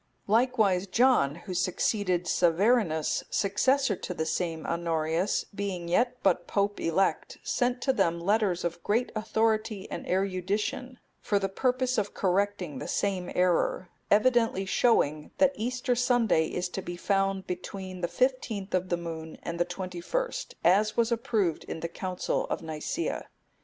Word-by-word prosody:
Likewise 215 -4 +2
John,(264) 195 - +3
who 190 - -4
succeeded 180 0 0
Severinus, 175 -1 +2
successor 225 +4 +2
to 180 - -6
the 160 - -1
same 160 0 -2
Honorius, 170 +2 0
being 195 -4 -3
yet 240 +8 +1
but 180 -2 +2
Pope 205 0 0
elect, 190 +4 0
sent 245 0 0
to 265 - +2
them 170 -8 +1
letters 195 -1 +1
of 170 0 -3
great 230 +4 0
authority 220 -1 0
and - - -5
erudition 195 +7 -1 0.2
for 205 - 0
the 195 -1 0
purpose 255 +4 0
of 205 -1 -3
correcting 190 -6 0
the - - -6
same 190 -3 -1
error; 180 0 +1 0.2
evidently 225 -2 +3
showing, 155 -8 +2
that 280 -1 +4
Easter 250 +3 -1
Sunday 240 -9 +2
is 180 0 -2
to 190 - -4
be 175 -1 -6
found 195 0 0
between 185 0 -6
the 175 - 0
fifteenth 220 0 -1
of 185 0 0
the 175 - +1
moon 160 -2 -7
and 170 0 -4
the 175 - +3
twenty 180 -1 -6
first, - - -3
as 210 +4 +3
was 235 0 +2
approved 220 - 0
in 165 - -6
the 170 - -2
Council 180 +2 -2
of - - -3
Nicaea. 160 - -3
195 Hz, 150 wpm, -28 LUFS, 175-225 Hz, 0.2 s, that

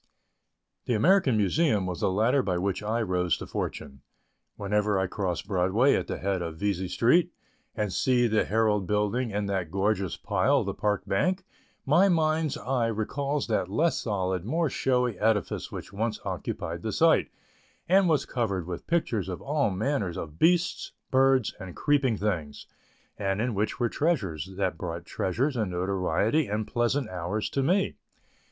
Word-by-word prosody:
The 120 - +1
American 145 - +4
Museum 105 - +2
was 90 -2 -4
the - - +1
ladder 115 +8 +2
by 90 -7 -1
which 95 +1 -1
I 110 +2 -1
rose 90 -3 0
to - - -7
fortune. 70 -2 -5 0.5
Whenever 105 0 0
I 95 - +1
cross 95 -3 -2
Broadway 100 +7 +2
at - - -1
the - - -3
head 95 -1 -1
of 85 -2 -5
Vesey 95 -1 -1
Street, 125 - +3 0.4
and 105 -4 -2
see 125 +4 +2
the 110 -2 +2
Herald 105 -3 +1
building 105 +4 0
and 100 0 -2
that 95 -4 -2
gorgeous 95 0 0
pile, 110 +7 +1
the 100 -1 -3
Park 105 -2 -1
Bank, 185 - 0 0.4
my 175 +8 +5
mind's 155 -3 +1
eye 125 -2 0
recalls 140 +6 -2
that 105 -5 -1
less 160 - +1
solid, 95 -5 -1
more 160 - 0
showy 125 -5 0
edifice 110 -2 0
which - - -8
once 110 +2 -2
occupied - - -4
the - - -3
site - - +3 0.6
and 190 0 +4
was 150 -4 +2
covered 100 -8 -2
with 90 0 -6
pictures 115 - 0
of 90 - -4
all 145 -4 0
manner 100 - -1
of 75 -1 -8
beasts, 175 +1 +2 0.2
birds 130 -3 +3
and 95 -3 -8
creeping 140 -6 +2
things, 85 -9 -3 0.5
and 95 0 -1
in 120 +1 0
which 105 +2 -1
were 120 - +2
treasures 110 - -1
that 95 -4 -1
brought 85 +1 -5
treasures 125 - -1
and 110 -5 -1
notoriety 95 - 0
and 105 +1 -2
pleasant 120 +5 0
hours 90 +4 -3
to 135 - 0
me. 185 +8 +1
105 Hz, 165 wpm, -27 LUFS, 95-130 Hz, 0.6 s, my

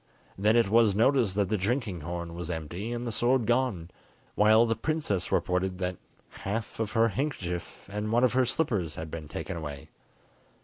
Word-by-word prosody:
Then 105 +3 +3
it 115 -3 +4
was 110 -1 +4
noticed 115 -3 +3
that 100 -2 +1
the 105 -2 0
drinking 105 - -1
horn 85 +1 -5
was 85 -1 -5
empty 85 +6 -4
and 120 0 -3
the 115 - -2
sword 120 +2 +2
gone, 120 -9 0 0.4
while 110 +2 +5
the 115 -1 +1
princess 115 - -1
reported 90 0 0
that 90 -1 -2 0.4
half 110 +4 -4
of 110 -2 -2
her 115 0 +4
handkerchief 95 - -4
and 105 +2 -3
one 120 +2 +3
of 125 -2 +4
her 130 -1 +3
slippers 105 - 0
had 80 -1 -6
been 80 -2 -6
taken 90 - -5
away. 75 -4 -7
105 Hz, 180 wpm, -28 LUFS, 90-120 Hz, 0.4 s, while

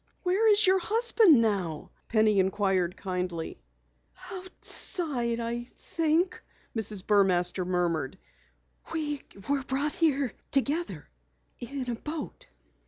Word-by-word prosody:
"Where 410 +4 +3
is 415 +1 +5
your 380 0 +5
husband 430 - +4
now?" 185 -8 -2 0.2
Penny 215 -2 +3
inquired 190 -2 +1
kindly. 180 - -4 0.7
"Outside, 320 -9 -1
I 235 +1 -3
think," 330 +6 -1 0.3
Mrs. 215 -4 -1
Burmaster 185 -3 +3
murmured. 170 -6 -1 0.7
"We 295 -3 -2 0.3
were 280 -1 +1
brought 275 +3 -1
here 285 -6 +1 0.2
together 275 - 0 0.5
in 260 +1 -5
a 240 - -1
boat." 300 +6 -6
240 Hz, 105 wpm, -28 LUFS, -, 0.7 s, is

